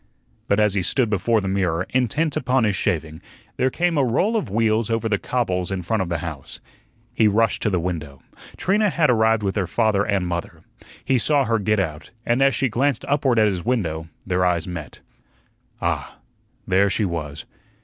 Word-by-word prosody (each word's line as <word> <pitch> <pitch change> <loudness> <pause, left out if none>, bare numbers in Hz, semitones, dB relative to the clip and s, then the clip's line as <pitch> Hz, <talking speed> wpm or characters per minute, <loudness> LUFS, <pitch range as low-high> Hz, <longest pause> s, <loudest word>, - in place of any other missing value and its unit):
But 100 - +2
as 105 -2 +3
he 100 - 0
stood 110 - +1
before 110 +2 +1
the 95 - -4
mirror, 95 -3 0
intent 135 +5 0
upon 130 0 +1
his 105 -3 +1
shaving, 80 -5 -2 0.4
there 130 - +2
came 170 +2 0
a - - +4
roll 150 - +1
of 215 - -1
wheels 110 +1 +1
over 115 0 0
the 100 -3 0
cobbles 90 -8 -1
in 95 -2 -3
front 105 +4 0
of 90 - -3
the 85 - -1
house. 75 -5 -7 0.5
He 110 - +3
rushed 110 +2 +2
to - - +1
the 95 -3 0
window. 80 -6 -5 0.3
Trina 205 +3 +2
had 160 -6 +2
arrived 110 -2 +2
with 95 -1 -1
her 95 -4 0
father 105 +1 +1
and 100 -3 0
mother. 85 -1 -5 0.4
He 130 -2 +2
saw 145 +2 +2
her 115 -1 +1
get 105 +1 +1
out, 75 -6 -3 0.2
and 120 +3 +1
as 135 -2 +4
she 135 - +1
glanced 130 +2 0
upward 135 -4 +1
at 110 - +5
his 95 -4 -1
window, 80 -10 -2 0.2
their 90 -1 0
eyes 90 -2 +1
met. 80 -7 -7 0.8
Ah, - - -3 0.5
there 95 +2 +3
she 105 +1 0
was. 80 -5 -5
105 Hz, 195 wpm, -22 LUFS, 90-125 Hz, 0.8 s, at